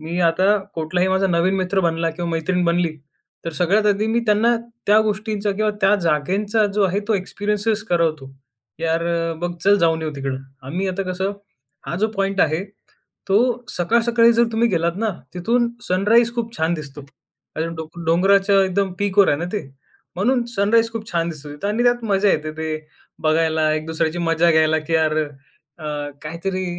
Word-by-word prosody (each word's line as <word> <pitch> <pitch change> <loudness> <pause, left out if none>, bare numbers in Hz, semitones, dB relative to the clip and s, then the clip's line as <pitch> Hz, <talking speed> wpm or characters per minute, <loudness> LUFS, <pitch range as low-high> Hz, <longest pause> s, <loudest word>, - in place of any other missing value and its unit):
मी 165 +3 -3
आता 190 +5 +3 0.2
कुठलाही 180 +3 0
माझा 190 +1 +2
नवीन 175 +2 +2
मित्र 190 +1 0
बनला 165 0 0
किंवा 170 +1 -4
मैत्रीण 175 +2 0
बनली 170 -2 +1 0.5
तर 165 - -3
सगळ्यात 200 +5 +2
आधी 205 +1 +2
मी 230 +1 +1
त्यांना 220 +3 +3 0.3
त्या 210 +1 +6
गोष्टींचा 210 0 -2
किंवा 215 +2 0
त्या 195 +2 +4
जागेंचा, 190 +7 +1
जो 205 +1 0
आहे 190 +2 0
तो 220 - +3
एक्सपिरियन्स 205 +2 -1
करवतो. 160 -6 0 0.5
"यार 165 0 0 0.4
बघ, 175 - -1
चल 200 +1 +6
जाऊन 165 -1 +2
येऊ 155 - -2
तिकडं." 135 -1 -3 0.3
आम्ही 185 +7 -2
आता 190 +1 -2
कसं 190 +2 -2 0.5
हा 170 - -3
जो 215 +3 +2
पॉइंट 195 0 0
आहे 160 +4 0 0.7
तो 195 - +4 0.3
सकाळ 180 +7 +1
सकाळी 235 0 +5
जर 235 +1 +4
तुम्ही 230 +1 +2
गेलात 170 -1 0
ना, 220 -1 0 0.2
तिथून 235 +7 +1 0.2
सनराईज 225 +6 +3
खूप 230 -1 -4
छान 160 +2 +1
दिसतो. 145 -2 -8 0.5
आणि 160 +1 -1
डों 160 0 -5 0.2
डोंगराच्या 195 +3 +4
एकदम 190 0 -1
पीकवर 200 -1 +3
आहे 145 - +3
ना 170 - -3
ते. 210 - -2 0.5
म्हणून 240 +5 +1
सनराईज 225 +3 +3
खूप 220 -2 -6
छान 170 0 0
दिसतो 150 -2 -9
तिथं. 150 +8 -4
आणि 220 +3 0
त्यात 240 -1 +2
मजा 195 +1 +3
येते 155 0 -1
ते 160 0 -3 0.6
बघायला, 160 -1 +2
एक 155 0 -4
दुसऱ्याची 160 +1 -1
मजा 165 +1 +3
घ्यायला 160 0 +3
की 165 - 0
यार 155 -1 +2 0.6
अ, - - -9 0.4
काहीतरी 185 +4 -3
185 Hz, 175 wpm, -21 LUFS, 165-210 Hz, 0.7 s, त्या